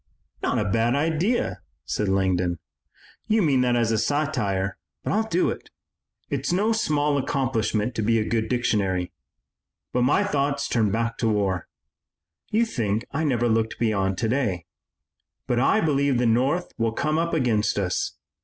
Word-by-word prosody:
'" - - -41
"Not - - 0
a 105 - 0
bad 115 +4 +2
idea," 160 - 0 0.2
said 105 -2 -1
Langdon. 90 -2 +1 0.7
"You 215 -1 +3
mean 135 -5 +3
that 125 -1 +2
as 115 -2 +1
satire, 110 - -1 0.2
but - - -1
I'll 220 +2 +1
do 180 -2 +1
it. - - -8 0.6
It's 140 +1 -2
no 205 +5 +2
small 150 -9 +1
accomplishment 120 -4 0
to 110 - -2
be 115 +2 +2
a 110 - 0
good 110 -1 0
dictionary. 100 -7 0 0.8
But 125 - +1
my 125 +4 +3
thoughts 140 0 0
turn 110 -3 +1
back 115 +2 -1
to 115 - +1
war. 100 -4 0 0.8
You 225 +2 +2
think 115 - -2
I 155 +3 -1
never 120 -5 +1
look 110 -1 0
beyond 100 -5 0
today, 110 - -1 0.8
but 120 -2 0
I 215 - +3
believe 140 -4 +2
the 125 - +1
North 130 +10 +1
will 115 -1 +1
come 155 +6 0
up 170 0 0
against 110 -8 +1
us. 95 -3 -1
120 Hz, 160 wpm, -24 LUFS, 105-145 Hz, 0.8 s, You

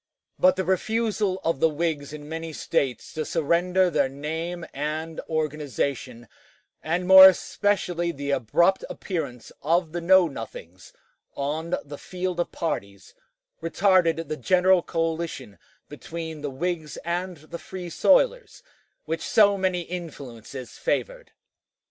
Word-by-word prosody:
But 275 0 +5
the 190 - -2
refusal 205 +1 0
of 165 -4 0
the 160 - +4
Whigs 150 -2 -2
in 150 -1 -9
many 160 0 -5
States 130 -4 -2
to 155 - -2
surrender 175 +4 +2
their 140 -4 +2
name 160 +5 -4
and 155 +3 -4
organization, 140 -6 -3 0.5
and 175 +3 -1
more 190 0 +11
especially 180 -2 -1
the 140 -2 -4
abrupt 140 - +2
appearance 140 - -5
of 165 +2 +1
the 175 +1 -4
Know 185 +1 +5
Nothings 95 - -9 0.4
on 155 +5 -2
the 145 0 -9
field 180 -1 -4
of 175 - -1
parties, 100 - -4 0.5
retarded 165 -1 +2
the 155 - -4
general 185 +5 +4
coalition 165 -10 -3 0.3
between 160 +3 -7
the 145 - -3
Whigs 160 +3 -3
and 175 +1 -2
the 155 +3 -9
Free 185 -2 -7
soilers - - +2 0.4
which 165 +1 -3
so 205 -2 +4
many 185 -2 0
influences 140 -8 -8
favored. - - -2
165 Hz, 125 wpm, -25 LUFS, 145-180 Hz, 0.5 s, more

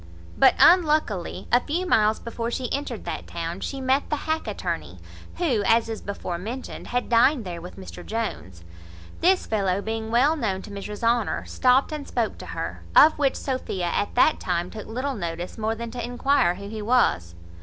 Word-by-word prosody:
But, - - +5
unluckily, 305 - +3
a 245 - +6
few 330 +8 -2
miles 215 -9 +3
before 235 0 -4
she 250 0 -3
entered 270 -5 -4
that - - -5
town, 170 +2 -5
she 275 - -4
met 265 +2 +1
the 300 - +1
hack 315 0 -1
attorney, - - -4 0.4
who, 280 -12 +1
as 230 0 +4
is 225 - -5
before 180 -3 -5
mentioned, 240 +8 -6
had 245 0 -1
dined 240 +1 +4
there 170 -2 -6
with 180 - -10
Mr 190 - -9
Jones. 95 - -5 0.6
This 370 +2 +3
fellow, 195 -3 0
being 220 +1 -4
well 260 +7 +3
known 195 -9 -2
to 210 - -10
Mrs 205 +2 -7
Honour, 230 -1 +1
stopt 255 +3 +3
and 300 -2 -5
spoke 235 -3 -2
to - - -9
her; - - -5
of 310 0 +7
which 275 -2 +2
Sophia 195 -10 -2
at 205 - -1
that 275 +5 +4
time 175 0 -2
took 215 -1 -8
little 255 +5 -3
notice, 175 -4 -5
more 220 0 -1
than 230 0 -6
to 245 +1 -5
enquire 245 -6 +2
who 200 +2 -8
he 215 +1 -6
was. 150 - +2
230 Hz, 185 wpm, -25 LUFS, 195-265 Hz, 0.6 s, of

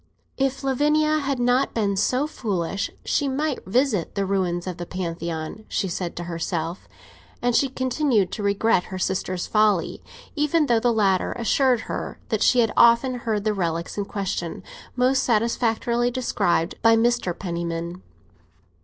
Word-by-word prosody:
"If 270 0 0
Lavinia 300 +3 +2
had 280 -2 -1
not 245 +2 +1
been 205 -3 +1
so 250 +8 +1
foolish, 195 - -2 0.2
she 285 - +1
might 280 +1 -1
visit 225 -4 +1
the 200 -1 0
ruins 185 -3 -1
of 180 -2 -5
the 175 - -5
Pantheon," 170 +1 -4
she 195 - -1
said 175 -1 -4
to 175 - -5
herself; 170 0 -4 0.5
and 245 -1 +1
she 275 +3 +3
continued 260 -5 +1
to 215 - -4
regret 200 -1 +2
her 185 - -6
sister's 185 -1 -2
folly, 210 -5 +1 0.3
even 300 +1 +2
though 235 -4 +3
the 240 +1 +2
latter 195 -5 +2
assured 245 +1 +2
her - - -5
that 220 - 0
she 250 - +5
had 225 -2 +1
often 235 +2 +5
heard 225 -4 -2
the 215 0 +1
relics 170 -3 -2
in 205 - -2
question 190 -4 -4 0.3
most 255 +2 +3
satisfactorily 235 +1 +1
described 205 -9 0
by 225 0 +6
Mr. 230 -6 +1
Penniman. 170 -1 -4
220 Hz, 155 wpm, -24 LUFS, 185-250 Hz, 0.5 s, by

